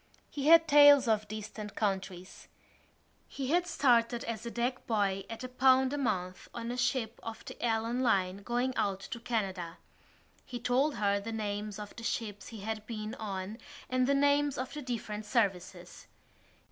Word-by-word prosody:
He 285 0 -3
had 330 0 +8
tales 290 -2 +8
of 215 -1 +1
distant 215 0 -7
countries. 190 -3 -3 0.8
He 270 0 -4
had 350 +1 +2
started 240 -6 +2
as 230 0 -5
a - - -2
deck 245 +2 -2
boy 195 -4 0
at 225 +2 -7
a - - -3
pound 260 +1 +4
a - - -1
month 185 -8 -2
on 235 0 -4
a - - -3
ship 245 -3 -1
of 225 -1 -8
the - - -9
Allan 230 +1 0
Line 195 -6 +2
going 240 +5 -1
out 195 -1 0
to 235 - -6
Canada. 190 -7 -3 0.7
He 245 - -7
told 255 +5 +1
her 200 -1 +1
the 215 +3 -6
names 210 -1 -3
of 210 -1 -8
the 230 - -9
ships 210 -3 -3
he 225 -3 -9
had 215 +1 -4
been 215 -1 -5
on 200 +1 -5 0.3
and 255 0 +2
the 280 - +3
names 285 0 +3
of 255 0 -4
the 300 - -5
different 215 -5 -5
services. 185 -6 -2
225 Hz, 170 wpm, -31 LUFS, 205-255 Hz, 0.8 s, had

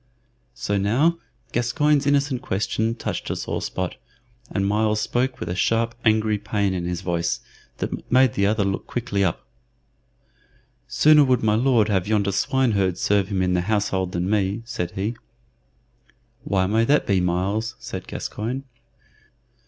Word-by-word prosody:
So 100 +12 -1
now 140 +13 +2 0.3
Gascoyne's 145 +4 +1
innocent 140 -3 +1
question 110 +1 -1
touched - - -4
a - - -1
sore - - -3
spot, 90 -1 -3 0.5
and 100 -1 -1
Myles 105 +1 +1
spoke 125 +4 -1
with - - -5
a 90 - -2
sharp, 115 +5 +1
angry 110 -1 +2
pain 100 -2 -1
in 90 -2 -3
his 90 0 -3
voice 85 -2 -1 0.4
that - - -5
made 130 -1 +5
the 100 0 +2
other 105 0 +1
look 95 0 -2
quickly 105 -5 -1
up. 85 -4 -1 1.4
"Sooner 150 -1 +5
would 130 -4 +2
my 105 -1 +3
Lord 115 -1 +3
have 95 -2 +1
yonder 105 -2 +1
swineherd 100 -5 +1
serve 100 -1 +2
him 95 -2 0
in 90 0 +1
the 90 - +2
household 95 -2 -1
than 90 +1 -1
me," 100 +1 0
said 115 -8 -3
he. 105 +5 -2 1.3
"Why 95 -1 +1
may 110 +4 +2
that 145 +4 +3
be, 95 -3 +2
Myles?" 95 +6 -1
said - - -7
Gascoyne. 125 +6 -4
105 Hz, 150 wpm, -23 LUFS, 95-120 Hz, 1.4 s, made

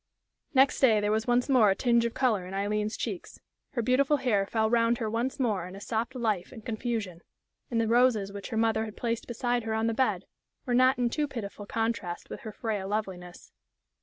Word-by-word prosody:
Next 265 +1 +5
day 225 -6 +5
there 205 0 0
was 220 +2 0
once 245 0 +2
more 250 -7 +5
a 195 - +3
tinge 235 0 +2
of 235 - -3
color 215 -9 +1
on 190 - -6
Aileen's 210 +2 -1
cheeks. 205 -7 -5 0.3
Her 240 -4 -1
beautiful 275 +4 +3
hair 210 -8 +1
fell 220 0 +1
round 230 +1 +3
her 225 - -2
once 235 +5 -2
more 210 -9 0
in 185 - -10
a - - -8
soft 230 +5 -3
life 215 -7 -1
and 225 -4 -11
confusion, 220 -6 -3 0.5
and 230 - 0
the 225 - +1
roses 230 -4 +3
which 200 -1 -7
her 225 - -3
mother 225 0 +2
had 215 -2 -9
placed 230 -1 -2
beside 240 0 -1
her 220 -1 -2
on 220 0 0
the 230 - +1
bed 260 +3 0 0.4
were 250 - -1
not 255 +2 +5
in 245 -1 +1
too 300 +2 0
pitiful 205 -5 -7
contrast 225 -6 -3
with - - -6
her 220 - -7
frail 210 -2 -3
loveliness. 190 -4 -5
225 Hz, 215 wpm, -28 LUFS, 210-245 Hz, 0.5 s, Next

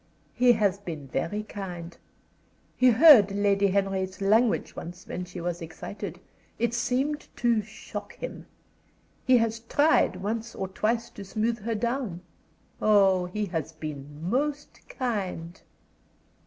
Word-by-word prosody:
"He 245 0 +5
has 200 -3 +1
been 165 -7 -7
very 165 +10 -2
kind. 175 -5 -7 0.8
He 255 - +5
heard 245 - +8
Lady 200 0 +3
Henry's 190 -1 -1
language 215 +4 +2
once 175 +2 -8
when 180 - -5
she 180 0 -8
was 175 0 -3
excited. 165 +5 -7 0.4
It 235 0 0
seemed 260 +5 -1
to 235 -2 +2
shock 215 +1 -8
him. - - -7 0.8
He 255 -1 +7
has 230 -1 0
tried 285 -1 +3
once 220 +5 -4
or 190 - -4
twice 230 +4 -1
to 200 - -9
smooth 220 +4 -1
her 225 +2 -2
down. 235 -5 -2 0.6
Oh, 195 -4 +4
he 210 +4 -2
has 165 -4 -4
been 150 0 -7
most 290 +6 -2
kind!" 190 -8 -3
205 Hz, 130 wpm, -27 LUFS, 180-235 Hz, 0.8 s, heard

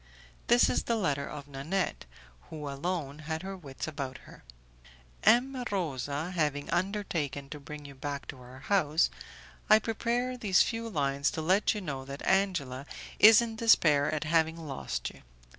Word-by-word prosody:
This 240 +1 +6
is - - 0
the 235 - +1
letter 145 -10 -1
of 145 -1 -8
Nanette, 145 - -2 0.4
who 150 -2 -6
alone 145 0 -3
had 160 +2 -4
her 195 0 -5
wits 145 -7 -7
about 140 -4 -5
her: - - -15 0.8
"M. 255 +2 +4
Rosa 150 -3 -2
having 150 -5 -1
undertaken 170 -8 -2
to 150 - -6
bring 150 +1 -9
you 140 - -9
back 140 +1 -5
to 130 - -7
our 125 +2 -12
house, 160 -2 +2 0.6
I 215 - +9
prepare 235 +3 -1
these 200 -6 +4
few 230 0 -3
lines 140 -5 0
to 160 - -4
let 190 +6 +3
you 210 - -3
know 140 -7 -4
that 140 +1 -7
Angela 150 -9 0 0.3
is 220 +2 +9
in 225 -1 -5
despair 155 -11 +4
at 155 0 -1
having 160 0 +2
lost 135 - -4
you. - - -17
155 Hz, 160 wpm, -30 LUFS, 140-200 Hz, 0.8 s, I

